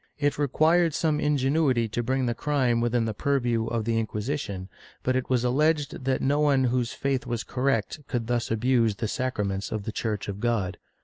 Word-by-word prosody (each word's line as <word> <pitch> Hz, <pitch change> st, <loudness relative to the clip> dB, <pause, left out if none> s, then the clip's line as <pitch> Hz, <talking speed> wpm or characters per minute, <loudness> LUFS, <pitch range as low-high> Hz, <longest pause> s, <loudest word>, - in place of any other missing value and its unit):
^ -, -, -43 dB
It 145 Hz, -1 st, 0 dB
required 160 Hz, +3 st, +3 dB
some 155 Hz, -2 st, +1 dB
ingenuity 140 Hz, -4 st, +2 dB
to 120 Hz, -, -1 dB
bring 130 Hz, +2 st, 0 dB
the 120 Hz, -, 0 dB
crime 125 Hz, -3 st, +1 dB
within 120 Hz, -1 st, +1 dB
the 110 Hz, -, -2 dB
purview 120 Hz, -3 st, 0 dB
of 115 Hz, -2 st, -2 dB
the 115 Hz, -1 st, +1 dB
Inquisition, 105 Hz, -3 st, -3 dB, 0.4 s
but 130 Hz, -, +1 dB
it 130 Hz, -, -1 dB
was 125 Hz, -2 st, +2 dB
alleged 145 Hz, +1 st, +1 dB
that 130 Hz, -1 st, 0 dB
no 145 Hz, +2 st, +2 dB
one 140 Hz, -3 st, +3 dB
whose 125 Hz, -1 st, +1 dB
faith 135 Hz, -2 st, -2 dB
was 120 Hz, -2 st, -2 dB
correct 130 Hz, 0 st, -1 dB
could 120 Hz, -2 st, -2 dB
thus 120 Hz, 0 st, -1 dB
abuse 115 Hz, -1 st, +2 dB
the 110 Hz, +2 st, -2 dB
sacraments 105 Hz, -6 st, -2 dB
of 110 Hz, -2 st, -3 dB
the 110 Hz, -, -4 dB
Church 110 Hz, -2 st, -3 dB
of 100 Hz, 0 st, -5 dB
God. 105 Hz, -6 st, -1 dB
125 Hz, 195 wpm, -26 LUFS, 115-140 Hz, 0.4 s, required